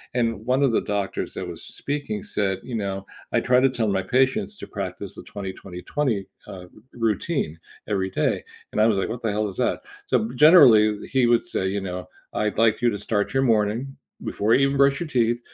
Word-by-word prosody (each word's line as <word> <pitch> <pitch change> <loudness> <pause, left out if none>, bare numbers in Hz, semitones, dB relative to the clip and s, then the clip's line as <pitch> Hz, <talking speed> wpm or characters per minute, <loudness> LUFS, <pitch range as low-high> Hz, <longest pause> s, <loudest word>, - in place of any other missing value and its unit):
and 115 -3 0
one 130 +3 +2
of 135 - +3
the - - +2
doctors 105 -2 -3
that - - -4
was - - -8
speaking 170 +9 -4
said, 100 - -1
you 125 - -8
know, 100 -2 -3 0.3
"I - - +3
try 125 0 +4
to 135 - +4
tell 115 -4 -1
my 95 -1 +1
patients 135 - +1
to - - -9
practice 95 0 -6
the - - -9
twenty, 100 -4 -6
twenty, 90 -2 -10
twenty, 120 -10 -1 0.2
uh, 90 -1 -9 0.3
routine, 115 - -1 0.3
every 95 -3 -1
day." - - 0 0.3
And 105 - +1
I 110 - +6
was 105 -3 +2
like, 95 - -1
"What 115 +1 -5
the 115 - 0
hell 105 +1 0
is 95 - -8
that?" 125 - 0 0.3
So, 220 - +1
generally, 115 - +6
he 130 -3 +2
would 120 +6 +3
say, 95 - -2
you 100 +1 -2
know, 90 -1 -6 0.2
"I'd 105 -1 -1
like 115 -1 +3
you 120 - +4
to 105 - -3
start 105 0 -1
your 135 - +2
morning, 115 +3 +1 0.3
before 105 +3 0
you 135 - +3
even 140 0 -1
brush 140 0 +4
your 170 - -4
teeth, 120 -2 +1
115 Hz, 215 wpm, -24 LUFS, 100-130 Hz, 0.3 s, I